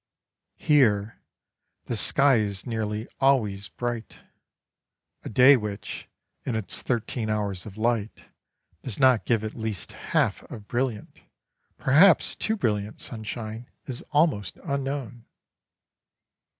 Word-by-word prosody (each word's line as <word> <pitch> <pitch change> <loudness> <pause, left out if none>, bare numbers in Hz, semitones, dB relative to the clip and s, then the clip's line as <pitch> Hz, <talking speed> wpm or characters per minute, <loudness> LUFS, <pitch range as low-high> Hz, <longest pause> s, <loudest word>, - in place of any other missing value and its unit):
Here 115 -8 +2 0.6
the - - -3
sky 140 -2 +4
is 100 -3 -1
nearly 110 -1 -3
always 105 -8 +2
bright; 120 -2 -5 1.0
a - - -6
day 125 +5 +7
which, 105 -4 -5 0.4
in 125 - -2
its 110 -3 -3
thirteen 115 -2 -2
hours 105 -3 -2
of 100 0 -11
light, 110 -1 -1 0.6
does 125 -6 -4
not 130 -4 +4
give 115 -3 +1
at 110 - -4
least 110 -4 -4
half - - 0
of 105 -1 -9
brilliant, 120 -4 -3 0.6
perhaps 160 +7 +5
too 220 0 -1
brilliant 105 - -1
sunshine, 110 0 -6 0.2
is 125 -2 -5
almost 145 - +1
unknown. 135 -4 -4
115 Hz, 110 wpm, -26 LUFS, 105-130 Hz, 1.0 s, day